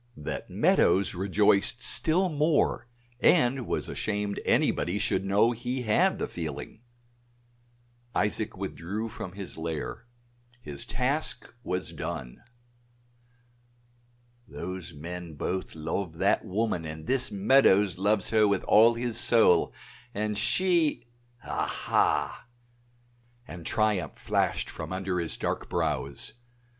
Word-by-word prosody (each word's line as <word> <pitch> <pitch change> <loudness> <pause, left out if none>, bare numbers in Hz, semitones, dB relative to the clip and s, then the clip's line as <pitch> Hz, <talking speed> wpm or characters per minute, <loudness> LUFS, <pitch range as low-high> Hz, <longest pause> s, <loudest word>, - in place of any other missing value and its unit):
That 75 - -5
Meadows 100 +1 +3
rejoiced 100 +4 +2
still 175 +10 +4
more 150 -5 +1 0.3
and 125 0 +3
was - - -2
ashamed 105 -1 -3
anybody 90 +3 +1
should 105 -1 0
know 100 +4 +3
he 125 +2 -3
had 175 - +2
the - - -2
feeling. 80 +5 -6 1.3
Isaac 105 0 0
withdrew 100 +3 -4
from 90 -3 -7
his 100 -4 -7
lair; 80 +7 -5 0.5
his 75 -10 -8
task 135 +3 0
was 90 -3 -3
done. 60 -2 -6 2.1
"Those 90 -3 -6
men 85 +1 -8
both 95 +5 -3
love 80 +3 -3
that - - +2
woman, 100 -3 -1
and 80 0 -7
this 130 -1 +2
Meadows 100 -3 +4
loves 100 0 +1
her 110 -2 +4
with 100 -1 0
all 115 +2 +5
his 120 -1 -2
soul, 110 -8 +4 0.4
and 105 0 -1
she 170 - +2 0.4
aha!" - - 0 1.0
and 85 -2 -8
triumph 105 -8 0
flashed - - 0
from - - -6
under 95 -1 -2
his 85 -1 -3
dark - - -3
brows. 75 -4 -2
100 Hz, 110 wpm, -28 LUFS, 90-115 Hz, 2.1 s, all